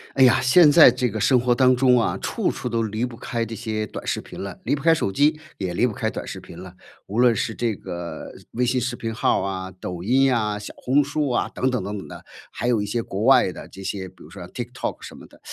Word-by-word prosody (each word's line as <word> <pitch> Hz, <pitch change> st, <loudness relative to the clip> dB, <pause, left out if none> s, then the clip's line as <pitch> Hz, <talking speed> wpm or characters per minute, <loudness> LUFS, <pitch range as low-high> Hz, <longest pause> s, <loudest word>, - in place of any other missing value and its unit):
哎 135 Hz, -, +5 dB
呀， 130 Hz, +1 st, +6 dB
现 145 Hz, +4 st, +6 dB
在 160 Hz, -5 st, +8 dB
这 125 Hz, 0 st, -1 dB
个 110 Hz, -, -4 dB
生 125 Hz, +4 st, +4 dB
活 120 Hz, 0 st, +2 dB
当 130 Hz, +1 st, +4 dB
中 125 Hz, -1 st, +4 dB
啊， 115 Hz, -, 0 dB
处 -, -, -1 dB
处 125 Hz, -, -5 dB
都 115 Hz, -1 st, 0 dB
离 110 Hz, +1 st, -3 dB
不 125 Hz, -2 st, -4 dB
开 115 Hz, -1 st, -3 dB
这 115 Hz, 0 st, -6 dB
些 110 Hz, -1 st, -3 dB
短 -, -, -8 dB
视 -, -, -1 dB
频 -, -, -10 dB
了。 100 Hz, -2 st, -7 dB
离 -, -, +1 dB
不 140 Hz, -, -7 dB
开 165 Hz, 0 st, +6 dB
手 125 Hz, -11 st, -1 dB
机， 150 Hz, +8 st, +2 dB, 0.2 s
也 95 Hz, -2 st, -3 dB
离 120 Hz, +8 st, +2 dB
不 115 Hz, -, -4 dB
开 -, -, -2 dB
短 -, -, -6 dB
视 -, -, -6 dB
频 85 Hz, -, -12 dB
了。 90 Hz, -1 st, -11 dB, 0.3 s
无 105 Hz, -, -5 dB
论 120 Hz, -2 st, +5 dB
是 110 Hz, -, -2 dB
这 115 Hz, -3 st, -1 dB
个 85 Hz, -3 st, -7 dB, 0.2 s
微 125 Hz, -, -1 dB
信 125 Hz, +1 st, +1 dB
视 125 Hz, +2 st, -2 dB
频 115 Hz, -1 st, -4 dB
号 110 Hz, -, +1 dB
啊、 95 Hz, -1 st, -4 dB
抖 90 Hz, -1 st, -7 dB
音 130 Hz, +5 st, +3 dB
呀、 110 Hz, -5 st, +1 dB
小 105 Hz, -, -8 dB
红 140 Hz, +3 st, +2 dB
书 145 Hz, 0 st, -2 dB
啊 120 Hz, -, 0 dB
等 130 Hz, -, -1 dB
等 125 Hz, -, -1 dB
等 105 Hz, +1 st, -4 dB
等 95 Hz, -, -8 dB
的。 -, -, -11 dB, 0.3 s
还 120 Hz, -, -4 dB
有 115 Hz, -4 st, +2 dB
一 105 Hz, -, -2 dB
些 115 Hz, +3 st, -2 dB
国 100 Hz, -1 st, -4 dB
外 125 Hz, -6 st, +5 dB
的 -, -, -10 dB
这 95 Hz, -, -11 dB
些 95 Hz, -1 st, -4 dB
比 -, -, -17 dB
如 -, -, -14 dB
说 -, -, -11 dB
像 -, -, -9 dB
tiktok -, -, -5 dB
什 -, -, -10 dB
么 -, -, -13 dB
的， -, -, -21 dB
115 Hz, 315 characters per minute, -23 LUFS, 100-130 Hz, 0.3 s, 在